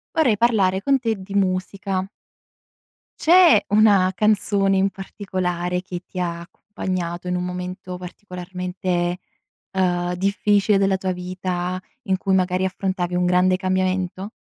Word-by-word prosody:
Vorrei 255 Hz, -10 st, +3 dB
parlare 200 Hz, -5 st, +2 dB
con 275 Hz, +5 st, +3 dB
te 230 Hz, -3 st, -1 dB
di 195 Hz, 0 st, -10 dB
musica. 190 Hz, 0 st, -1 dB, 1.1 s
C'è 340 Hz, -, +6 dB
una 205 Hz, -3 st, +5 dB
canzone 200 Hz, -1 st, +2 dB
in 195 Hz, +1 st, +2 dB
particolare 180 Hz, -3 st, -3 dB
che 180 Hz, -1 st, -7 dB
ti 185 Hz, -, -7 dB
ha 170 Hz, -1 st, -2 dB
accompagnato 175 Hz, -1 st, -5 dB
in 180 Hz, -, 0 dB
un 180 Hz, -, -1 dB
momento 180 Hz, +1 st, -5 dB
particolarmente, 180 Hz, -1 st, -4 dB, 0.5 s
ehm, 180 Hz, -2 st, 0 dB
difficile 200 Hz, +2 st, +2 dB
della 195 Hz, -1 st, +2 dB
tua 185 Hz, 0 st, -2 dB
vita 180 Hz, 0 st, -3 dB, 0.2 s
in 190 Hz, -4 st, 0 dB
cui 190 Hz, 0 st, +1 dB
magari 185 Hz, 0 st, +1 dB
affrontavi 185 Hz, -1 st, -2 dB
un 180 Hz, 0 st, +1 dB
grande 180 Hz, +1 st, +3 dB
cambiamento? 185 Hz, +1 st, -1 dB
185 Hz, 130 wpm, -22 LUFS, 180-195 Hz, 1.1 s, C'è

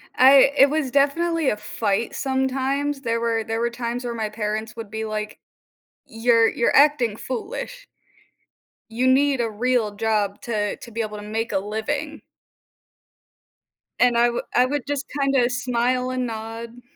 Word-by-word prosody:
I 270 Hz, +1 st, +7 dB
it 275 Hz, -, +7 dB
was 295 Hz, -4 st, -1 dB
definitely 315 Hz, +2 st, +2 dB
a 210 Hz, -, -1 dB
fight 210 Hz, +1 st, -2 dB
sometimes, 270 Hz, +1 st, -1 dB
there 230 Hz, -3 st, -1 dB
were 230 Hz, -1 st, 0 dB
there 225 Hz, +1 st, -3 dB
were 235 Hz, +1 st, 0 dB
times 240 Hz, +1 st, -4 dB
where 235 Hz, -, -3 dB
my 220 Hz, -2 st, -3 dB
parents 215 Hz, 0 st, -4 dB
would 225 Hz, -3 st, -8 dB
be 220 Hz, 0 st, -3 dB
like, 215 Hz, 0 st, -5 dB, 0.7 s
"You're 230 Hz, 0 st, +3 dB
you're 235 Hz, -, 0 dB
acting 275 Hz, -7 st, +4 dB
foolish" -, -, -6 dB, 1.1 s
you 235 Hz, +3 st, -1 dB
need 270 Hz, 0 st, +3 dB
a 230 Hz, -, -1 dB
real 225 Hz, -1 st, 0 dB
job 210 Hz, -2 st, -1 dB
to 210 Hz, -3 st, -2 dB
to 235 Hz, -, -12 dB
be 230 Hz, +1 st, -3 dB
able 215 Hz, -1 st, -5 dB
to 205 Hz, -, -8 dB
make 225 Hz, +2 st, -3 dB
a 200 Hz, -, +1 dB
living. 245 Hz, +9 st, -4 dB, 1.8 s
And 245 Hz, -1 st, +4 dB
I 240 Hz, +1 st, +4 dB
would 240 Hz, -, -3 dB
I 250 Hz, -, +5 dB
would 285 Hz, +1 st, -2 dB
just 290 Hz, 0 st, -2 dB
kinda 270 Hz, -3 st, +2 dB
smile 250 Hz, 0 st, 0 dB
and 255 Hz, -1 st, -2 dB
nod. 225 Hz, +2 st, -7 dB
235 Hz, 160 wpm, -23 LUFS, 220-265 Hz, 1.8 s, I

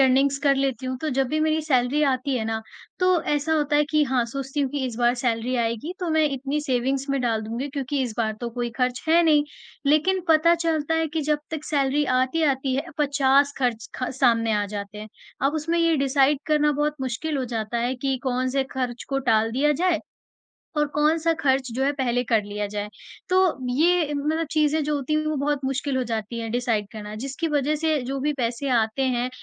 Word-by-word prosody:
Earnings 270 Hz, +1 st, +3 dB
कर 280 Hz, -1 st, +4 dB
लेती 265 Hz, -2 st, -1 dB
हूँ 255 Hz, 0 st, -2 dB
तो 315 Hz, -, -1 dB
जब 270 Hz, -, +3 dB
भी 310 Hz, +3 st, 0 dB
मेरी 315 Hz, 0 st, +2 dB
सैलरी 270 Hz, -1 st, +2 dB
आती 260 Hz, +1 st, -1 dB
है 225 Hz, -, -2 dB
ना, 220 Hz, 0 st, -2 dB, 0.4 s
तो 365 Hz, -2 st, +3 dB
ऐसा 295 Hz, +2 st, 0 dB
होता 295 Hz, -1 st, +1 dB
है 295 Hz, -, +4 dB
कि 305 Hz, -1 st, +3 dB
हाँ, 260 Hz, -3 st, +1 dB
सोचती 270 Hz, +3 st, -4 dB
हूँ 275 Hz, -2 st, 0 dB
कि 280 Hz, -1 st, -2 dB
इस 240 Hz, -3 st, -6 dB
बार 240 Hz, 0 st, +3 dB
सैलरी 240 Hz, +1 st, 0 dB
आएगी 235 Hz, +7 st, -2 dB
तो 355 Hz, -2 st, -1 dB
मैं 315 Hz, 0 st, +3 dB
इतनी 275 Hz, +2 st, -2 dB
सेविंग्स 270 Hz, 0 st, -1 dB
में 275 Hz, -, 0 dB
डाल 230 Hz, -3 st, 0 dB
दूँगी 240 Hz, +5 st, -3 dB
क्योंकि 280 Hz, 0 st, -2 dB
इस 240 Hz, -4 st, -3 dB
बार 220 Hz, -2 st, +1 dB
तो 240 Hz, -1 st, -3 dB
कोई 240 Hz, 0 st, -3 dB
खर्च 250 Hz, 0 st, 0 dB
है 335 Hz, +2 st, +5 dB
नहीं। 300 Hz, -3 st, +4 dB, 0.4 s
लेकिन 310 Hz, +6 st, +3 dB
पता 325 Hz, +2 st, +5 dB
चलता 325 Hz, -2 st, 0 dB
है 325 Hz, 0 st, +1 dB
कि 315 Hz, +2 st, -2 dB
जब 300 Hz, +1 st, +1 dB
तक 315 Hz, -2 st, -5 dB
सैलरी 285 Hz, 0 st, +1 dB
आती, 260 Hz, +4 st, +1 dB
आती 270 Hz, -3 st, +1 dB
है, 280 Hz, +5 st, -2 dB
50 280 Hz, -1 st, +3 dB
खर्च 240 Hz, -4 st, -1 dB
ख 255 Hz, -, -2 dB
सामने 230 Hz, -3 st, +3 dB
आ 205 Hz, -1 st, +1 dB
जाते 205 Hz, 0 st, -6 dB
हैं, 215 Hz, +1 st, -8 dB, 0.3 s
अब 275 Hz, +3 st, +2 dB
उसमें 325 Hz, +2 st, -1 dB
ये 335 Hz, -1 st, +3 dB
डिसाइड 275 Hz, +1 st, +3 dB
करना 300 Hz, -1 st, +3 dB
बहुत 295 Hz, +1 st, 0 dB
मुश्किल 265 Hz, +4 st, -2 dB
हो 260 Hz, -, -1 dB
जाता 230 Hz, -1 st, -3 dB
है 245 Hz, +2 st, 0 dB
कि 265 Hz, +1 st, -1 dB
कौन-से 255 Hz, +1 st, 0 dB
खर्च 250 Hz, -3 st, -3 dB
को 275 Hz, -, 0 dB
टाल 220 Hz, 0 st, +3 dB
दिया 290 Hz, +5 st, +2 dB
जाए 360 Hz, -3 st, +2 dB, 0.8 s
और 300 Hz, 0 st, +2 dB
कौन-सा 315 Hz, +2 st, +2 dB
खर्च 265 Hz, -2 st, +1 dB
जो 265 Hz, +2 st, 0 dB
है 280 Hz, -, +2 dB
पहले 245 Hz, -3 st, 0 dB
कर 225 Hz, -2 st, +2 dB
लिया 205 Hz, 0 st, -3 dB
जाए। 205 Hz, 0 st, -3 dB, 0.4 s
तो 370 Hz, -, +2 dB, 0.4 s
ये 325 Hz, +1 st, +3 dB
म 310 Hz, +3 st, 0 dB
चीज़ें 310 Hz, 0 st, +2 dB
जो 300 Hz, +1 st, 0 dB
होती 285 Hz, +2 st, -2 dB
हैं 310 Hz, 0 st, +1 dB
वो 310 Hz, 0 st, 0 dB
बहुत 285 Hz, 0 st, 0 dB
मुश्किल 270 Hz, +1 st, -1 dB
हो 260 Hz, -, +1 dB
जाती 225 Hz, +1 st, -3 dB
है 225 Hz, -, -4 dB
डिसाइड 230 Hz, -3 st, 0 dB
करना 210 Hz, -1 st, -7 dB
जिसकी 275 Hz, +5 st, -3 dB
वजह 295 Hz, 0 st, +1 dB
से 310 Hz, -1 st, +1 dB
जो 270 Hz, +2 st, -3 dB
भी 295 Hz, +2 st, 0 dB
पैसे 240 Hz, +3 st, -1 dB
आते 225 Hz, +4 st, 0 dB
हैं, 250 Hz, -1 st, 0 dB
275 Hz, 220 wpm, -24 LUFS, 245-300 Hz, 0.8 s, है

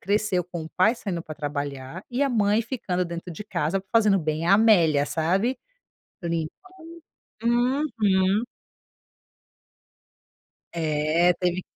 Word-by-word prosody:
cresceu 200 Hz, -3 st, 0 dB
com 175 Hz, -1 st, -6 dB
o -, -, -8 dB
pai 215 Hz, +6 st, +4 dB
saindo 190 Hz, -8 st, -4 dB
pra 155 Hz, -2 st, -8 dB
trabalhar 145 Hz, +2 st, -5 dB
e 250 Hz, +3 st, 0 dB
a 280 Hz, -, +2 dB
mãe 215 Hz, -2 st, +2 dB
ficando 195 Hz, -7 st, -2 dB
dentro 170 Hz, +1 st, -6 dB
de 210 Hz, -, -8 dB
casa, 175 Hz, 0 st, -1 dB
fazendo 210 Hz, -4 st, +4 dB
bem 155 Hz, +1 st, -2 dB
a 195 Hz, -, +6 dB
Amélia, 170 Hz, -10 st, +4 dB
sabe. 185 Hz, -, 0 dB, 0.7 s
Limpando 165 Hz, -2 st, -2 dB, 0.9 s
uhum. 235 Hz, -5 st, +2 dB, 2.3 s
É, 160 Hz, +2 st, +2 dB
teve 180 Hz, 0 st, 0 dB
180 Hz, 115 wpm, -25 LUFS, 160-215 Hz, 2.3 s, a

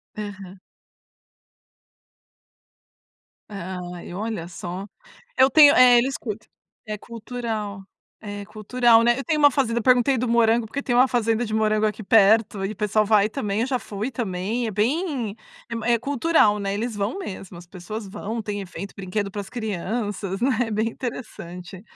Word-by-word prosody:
Aham. 200 Hz, -3 st, -8 dB, 2.9 s
Ai, 180 Hz, -3 st, -7 dB
olha 205 Hz, -3 st, -4 dB
só. 180 Hz, +2 st, -6 dB, 0.5 s
Eu 260 Hz, -, +6 dB
tenho 290 Hz, -1 st, +8 dB
eh, 250 Hz, -1 st, +7 dB
eles 265 Hz, +3 st, +1 dB
cul 215 Hz, -4 st, -4 dB, 0.5 s
é 215 Hz, -1 st, -4 dB
cultural, 225 Hz, -3 st, -5 dB, 0.4 s
é 205 Hz, -1 st, -7 dB
cultural, 225 Hz, +2 st, +3 dB
né. 240 Hz, +1 st, +3 dB
Eu 270 Hz, -, -4 dB
tenho 310 Hz, -2 st, 0 dB
uma 290 Hz, -1 st, +6 dB
fazenda 235 Hz, -3 st, 0 dB
eu -, -, -5 dB
perguntei 255 Hz, +1 st, +4 dB
do 250 Hz, -, -1 dB
morango, 230 Hz, 0 st, +3 dB
porque 275 Hz, +6 st, -5 dB
tem 245 Hz, -, -1 dB
uma 255 Hz, +2 st, +6 dB
fazenda 230 Hz, -1 st, 0 dB
de 215 Hz, -, -5 dB
morango 215 Hz, 0 st, +2 dB
aqui 215 Hz, +1 st, -2 dB
perto 205 Hz, -1 st, +4 dB
e 205 Hz, -, -3 dB
o -, -, -8 dB
pessoal 210 Hz, +2 st, +1 dB
vai 210 Hz, 0 st, +4 dB
também, 210 Hz, -4 st, -2 dB
eu 250 Hz, -, 0 dB
já 255 Hz, -2 st, 0 dB
fui 215 Hz, +5 st, -5 dB
também, 225 Hz, +1 st, -2 dB
é -, -, -3 dB
bem 245 Hz, -, -1 dB, 0.3 s
é 230 Hz, -, -5 dB
m 230 Hz, -1 st, -4 dB
é 235 Hz, -1 st, +3 dB
cultural, 275 Hz, -5 st, +2 dB
né, 200 Hz, 0 st, -2 dB
eles 225 Hz, +2 st, -3 dB
vão 205 Hz, -, -2 dB
mesmo. 190 Hz, -, -7 dB
As 175 Hz, -, -13 dB
pessoas 195 Hz, +4 st, -7 dB
vão, 220 Hz, +4 st, -5 dB
tem 205 Hz, -1 st, -4 dB
efeito, 195 Hz, +1 st, -8 dB
brinquedo 195 Hz, +1 st, -3 dB
para 205 Hz, -, -4 dB
as 195 Hz, -, -11 dB
crianças, 205 Hz, -2 st, -3 dB
né, 245 Hz, -3 st, +1 dB
bem 215 Hz, +2 st, 0 dB
interessante. 185 Hz, -7 st, -7 dB
215 Hz, 165 wpm, -23 LUFS, 200-240 Hz, 2.9 s, tenho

